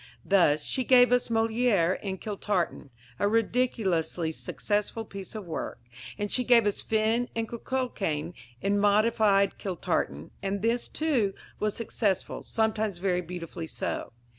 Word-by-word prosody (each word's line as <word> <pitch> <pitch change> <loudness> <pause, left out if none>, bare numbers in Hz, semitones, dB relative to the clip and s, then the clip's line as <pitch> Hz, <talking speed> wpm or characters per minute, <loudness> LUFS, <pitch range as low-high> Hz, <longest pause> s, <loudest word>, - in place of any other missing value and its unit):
Thus, 155 -6 +4
she 260 - -1
gave 245 0 +6
us 250 0 +3
Molière 225 -5 +2
in 190 -2 -3
Kiltartan 200 -7 -2 0.3
a - - +3
ridiculously 205 -7 +1
successful 210 +6 -2
piece 195 0 -8
of 215 -3 -5
work 165 - -4 0.4
and 205 0 -3
she 250 - +2
gave 240 -2 +5
us 205 - 0
Finn 225 +2 +1
and 225 0 -1
Cuchullain 210 - -2 0.3
in 200 +1 +2
modified 205 -1 +3
Kiltartan, 125 - -2
and 200 +1 -2
this, 235 +1 +1
too, 255 -11 0 0.2
was 210 -1 0
successful, 205 -4 -1
sometimes 220 -3 0
very 180 -1 0
beautifully 170 -1 -6
so. - - -3
205 Hz, 135 wpm, -28 LUFS, 185-230 Hz, 0.4 s, gave